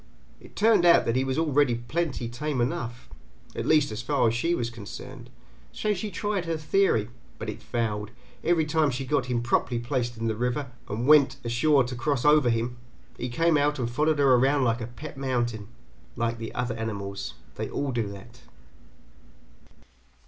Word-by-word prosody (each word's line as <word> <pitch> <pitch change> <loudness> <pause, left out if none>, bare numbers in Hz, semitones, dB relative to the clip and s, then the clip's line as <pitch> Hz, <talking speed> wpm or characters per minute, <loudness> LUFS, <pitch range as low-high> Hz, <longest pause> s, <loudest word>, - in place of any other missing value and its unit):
It - - -16
turned 215 -3 +4
out 170 -1 +6
that 115 - 0
he 130 - +2
was 135 0 -2
already 145 -5 +2
plenty 125 +1 -2
tame 130 +4 -3
enough 120 0 -2 0.5
at - - -3
least 150 -5 +4
as 110 - -4
far 140 0 +2
as 110 - +2
she 165 +9 +1
was 120 -4 -2
concerned 115 -4 -9 0.4
so 210 -1 -1
she 210 +2 -4
tried 200 0 -2
her 165 -1 -1
theory, 150 - +1 0.3
but - - -4
it - - -11
failed: 105 -3 -2 0.3
every 165 -2 +2
time 155 -1 +2
she 135 +1 -3
got 135 -2 0
him 120 -1 -1
properly 120 0 +1
placed 120 -1 -2
in 115 - -3
the 110 -1 0
river 125 +4 -2 0.2
and 115 +4 -2
went 140 -2 +6
ashore 130 +4 +3
to 125 +1 -5
cross 130 +1 -1
over 150 -4 +5
him, 120 +1 -1 0.4
he 125 0 -4
came 165 +6 +2
out 145 +1 +1
and 120 -3 -2
followed 150 +4 +2
her 140 -2 +5
around 135 +3 +3
like 115 -1 +1
a 110 - -4
pet 135 +5 -9
mountain. 120 -5 -1 0.5
Like 115 0 -1
the 115 - -5
other 125 -1 -1
animals. 100 -3 -4 0.2
They - - -4
all 140 -1 -2
do 115 -4 -1
that. 110 +5 -11
125 Hz, 185 wpm, -26 LUFS, 120-150 Hz, 0.5 s, out